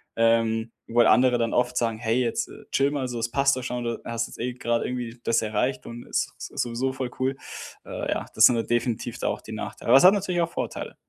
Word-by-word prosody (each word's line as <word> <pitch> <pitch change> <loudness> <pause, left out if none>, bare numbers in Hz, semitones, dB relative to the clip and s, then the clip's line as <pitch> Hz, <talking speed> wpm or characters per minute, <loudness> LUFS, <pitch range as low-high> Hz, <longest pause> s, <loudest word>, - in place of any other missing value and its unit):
ähm, 115 0 +2 0.2
wo 120 +1 +3
andere 125 +1 +5
dann 115 -1 -1
oft 125 0 +1
sagen: 115 -2 0
„Hey, 120 +2 +1
jetzt 115 -2 -1 0.2
chille 140 +1 +2
mal, 140 -3 -2
so 120 - -4
das 115 0 -2
passt 140 -1 +3
doch 130 - -4
schon. 125 -1 -3
Du 115 -1 -3
hast 115 0 -2
jetzt - - -13
eh 125 +1 -2
grade 120 -1 -1
irgendwie 125 -1 -4
das 115 - +2
erreicht 125 +4 -1
und 120 +1 -8
ist - - -1
sowieso 125 +3 -2
voll 130 -2 -3
cool." 130 +1 0 0.5
Äh, - - -4
ja, - - -1
das - - +8
sind 125 - +6
da 115 - +1
definitiv 120 -1 -1
da - - -1
auch - - -2
die - - -11
Nachteile. - - -6
Aber 125 - +9
es 135 - +5
hat 190 - +9
natürlich 185 -4 0
auch 170 0 -1
Vorteile. - - -5
120 Hz, 240 wpm, -25 LUFS, 115-130 Hz, 0.5 s, Aber